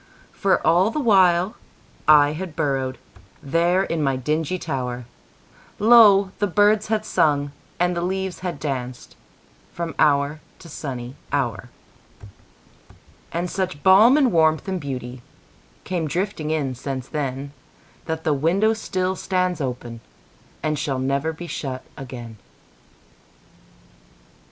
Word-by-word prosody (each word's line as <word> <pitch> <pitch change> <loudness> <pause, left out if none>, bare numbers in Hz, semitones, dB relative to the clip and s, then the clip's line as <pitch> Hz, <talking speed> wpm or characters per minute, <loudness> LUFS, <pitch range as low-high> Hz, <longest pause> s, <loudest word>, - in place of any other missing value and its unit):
For 195 -2 +1
all 180 +5 +4
the 265 - -3
while 190 -5 +4 0.5
I 145 -1 +6
had 165 +1 -6
burrowedThere 145 +6 -1
in 165 -2 -2
my 135 -2 +1
dingy 155 +6 -1
tower, 125 -7 -4 0.7
Lo! 205 -4 +6
the 205 - +1
birds 205 +3 +3
had 215 0 -1
sung 145 -6 +1 0.3
and 180 0 +1
the 170 - -2
leaves 190 +1 -3
had 180 -5 -4
dancedFrom 130 - -7
hour 145 +1 +2 0.2
to 170 - -14
sunny 130 -5 -6 0.2
hour. 120 -6 -2 1.6
And 170 +2 -2
such 185 -5 -3
balm 210 +8 +7
and 270 -5 +3
warmth 160 0 +2
and 190 -2 -2
beautyCame 130 - -7
drifting 170 0 -2
in 150 -4 -1
since 130 0 -5
then, 140 -2 -4 0.5
That 160 0 -4
the 155 - +2
window 180 +10 +2
still 190 -4 -2
stands 185 -2 -1
openAnd 125 - -6
shall 145 -3 -2
never 140 +4 -1
be 160 +2 -9
shut 135 -5 -5
again. 120 -4 -9
155 Hz, 115 wpm, -22 LUFS, 135-185 Hz, 1.6 s, balm